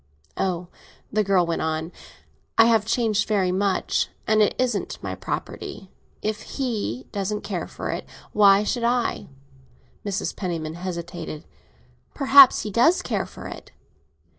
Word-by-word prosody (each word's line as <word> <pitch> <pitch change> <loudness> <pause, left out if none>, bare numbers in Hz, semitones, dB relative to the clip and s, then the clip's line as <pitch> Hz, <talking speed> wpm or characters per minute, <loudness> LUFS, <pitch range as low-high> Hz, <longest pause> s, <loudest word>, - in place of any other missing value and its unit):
Oh," 180 -2 -2 0.4
the 215 0 +3
girl 190 -3 +3
went 170 -1 -2
on, 160 +1 -2 0.7
"I 225 - +8
have 225 -2 +3
changed 225 -3 +1
very 195 -4 +1
much. 190 0 0 0.2
And 215 0 +3
it 210 - +3
isn't 245 -5 -1
my - - -3
property. 190 - -6 0.3
If 215 0 -2 0.2
he 215 - -2
doesn't 205 +1 -2
care 195 -4 -4
for - - -5
it, - - -5 0.3
why 200 -1 +6
should 235 +3 -1
I?" 240 0 0 0.8
Mrs. 200 0 -2
Penniman 165 -5 -3
hesitated. 170 -3 -6 0.7
"Perhaps 275 -1 +7
he 210 - -4
does 285 - +4
care - - -2
for - - -11
it." - - -9
205 Hz, 140 wpm, -24 LUFS, 180-225 Hz, 0.8 s, I